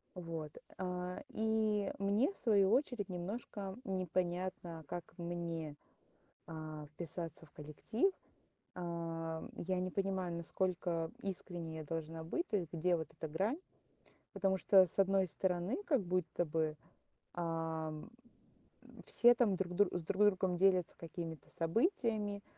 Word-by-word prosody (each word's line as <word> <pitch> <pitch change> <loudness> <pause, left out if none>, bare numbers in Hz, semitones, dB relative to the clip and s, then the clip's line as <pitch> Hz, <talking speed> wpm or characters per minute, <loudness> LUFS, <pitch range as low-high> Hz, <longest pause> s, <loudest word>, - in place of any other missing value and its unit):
Вот, 165 -4 -4 0.3
а, 180 -1 -3
и 220 -3 +1
мне, 205 - +3
в - - -19
свою 200 -4 +4
очередь, 245 -6 +2
немножко 195 +2 -4
непонятно, 180 -2 -1
как 175 +3 -3
мне, 170 -3 -3 0.7
а, 155 -2 -6
вписаться 165 +1 -6
в 150 - -22
коллектив. 155 - 0 0.7
А, 165 -2 -3
я 185 +1 0
не 185 0 -1
понимаю, 190 -2 0
насколько 170 -1 -1
искренней 175 -4 -4
я 155 - -5
должна 165 +1 -4
быть, 340 - -1
то 210 - +2
есть 170 -4 -4
где 175 +1 +2
вот 160 -2 -4
эта 160 0 -5
грань. 195 - 0 0.8
Потому 195 -1 +2
что, 190 0 +7
с 170 - -12
одной 195 -1 +4
стороны, 180 - 0
как 275 - +3
будто 180 -1 0
бы, 155 -1 0 0.6
ам, 165 0 -2 1.0
все 240 0 +7
там 230 -5 +3
друг 180 -1 -2
друг 200 +1 +4
с 175 - -5
друг 195 +5 +2
другом 190 -3 +3
делятся 185 -2 +4
какими-то 165 -2 -6
событиями, 210 - +1
180 Hz, 130 wpm, -37 LUFS, 165-195 Hz, 1.0 s, что